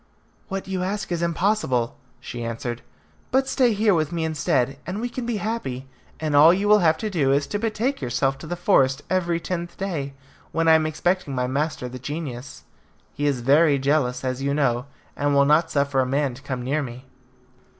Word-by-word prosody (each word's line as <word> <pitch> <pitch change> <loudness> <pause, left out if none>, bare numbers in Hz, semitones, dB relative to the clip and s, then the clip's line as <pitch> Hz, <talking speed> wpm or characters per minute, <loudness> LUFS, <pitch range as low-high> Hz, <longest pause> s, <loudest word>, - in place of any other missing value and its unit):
"What 195 0 -4
you 190 -1 -2
ask 195 +1 -3
is 170 -1 -1
impossible," 170 - 0 0.2
she 120 -1 -6
answered; 115 +1 -4 0.5
"but 265 +1 +2
stay 255 -3 +3
here 210 0 +3
with 155 -2 0
me 170 -1 -2
instead, 140 -4 0
and 185 +3 -3
we 240 +2 -2
can 240 0 -5
be 235 -3 -1
happy, 200 - -3 0.3
and 155 -2 -1
all 150 +3 +8
you 195 +3 +1
will 210 0 +6
have 160 -3 +3
to - - 0
do 145 -8 +2
is 140 +1 +2
to 205 - -3
betake 225 - -1
yourself 135 +2 0
to 160 - -9
the 175 - -3
forest 145 -7 +2
every 175 -2 +1
tenth 170 0 -5
day, 150 -8 -3 0.4
when 165 0 0
I 160 - +7
am 160 -1 +4
expecting 160 -1 -1
my 125 0 0
master 140 0 -2
the 130 +1 -8
genius. 135 -2 -6 0.5
He 145 +1 -1
is 135 -4 0
very 145 +3 +4
jealous, 135 -2 0
as 130 0 -2
you 140 +1 0
know, 125 -3 +1 0.3
and 145 0 +1
will 140 0 +5
not 155 +3 +4
suffer 140 -1 +1
a 130 - +3
man 140 0 0
to 125 - -12
come 130 -3 -4
near 140 +5 0
me." 125 -1 -7
150 Hz, 200 wpm, -23 LUFS, 135-185 Hz, 0.5 s, all